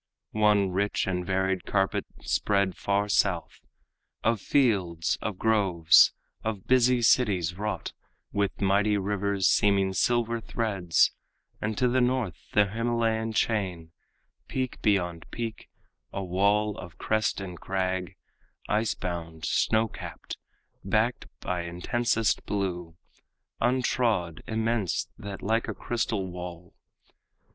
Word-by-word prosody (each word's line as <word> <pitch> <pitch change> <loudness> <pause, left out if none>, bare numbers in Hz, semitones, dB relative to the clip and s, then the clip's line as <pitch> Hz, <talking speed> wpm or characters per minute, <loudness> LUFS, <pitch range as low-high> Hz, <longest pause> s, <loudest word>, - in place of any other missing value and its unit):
One 105 -3 +3
rich 100 +3 0
and 90 -2 -1
varied 95 0 0
carpet 95 -1 0
spread 100 -3 +1
far 100 +1 0
south, 95 -4 0 0.6
Of 115 -2 +1
fields, 95 - +1
of 105 -2 -3
groves, 95 -8 +5 0.3
of 110 -4 -3
busy 125 -1 +4
cities 95 -8 +3
wrought, 105 +2 -4 0.4
With 100 0 -1
mighty 100 +2 +3
rivers 100 -1 0
seeming 100 -2 +3
silver 115 +2 +1
threads; 100 -8 +1 0.5
And 105 0 -2
to 125 - +3
the 125 +1 +2
north 125 -9 -1
the 105 -1 +5
Himalayan 115 -1 0
chain, 95 -7 -1 0.6
Peak 130 -1 -3
beyond 90 -6 0
peak, 115 -2 -5 0.4
a 100 - -4
wall 100 +3 +1
of 85 -1 -10
crest 110 -1 0
and 90 -3 -7
crag, 95 -1 -2 0.5
Ice 105 +1 +1
bound, 85 -3 -5
snow 110 +1 +2
capped, - - -8 0.5
backed 110 +5 0
by 90 -1 -2
intensest 110 +6 0
blue, 90 -5 -3 0.7
Untrod, 120 - +1
immense, 110 -3 -1
that, 100 -1 -7
like 110 +3 +1
a - - -4
crystal 115 -4 -2
wall. 90 -1 -8
100 Hz, 115 wpm, -27 LUFS, 90-110 Hz, 0.7 s, groves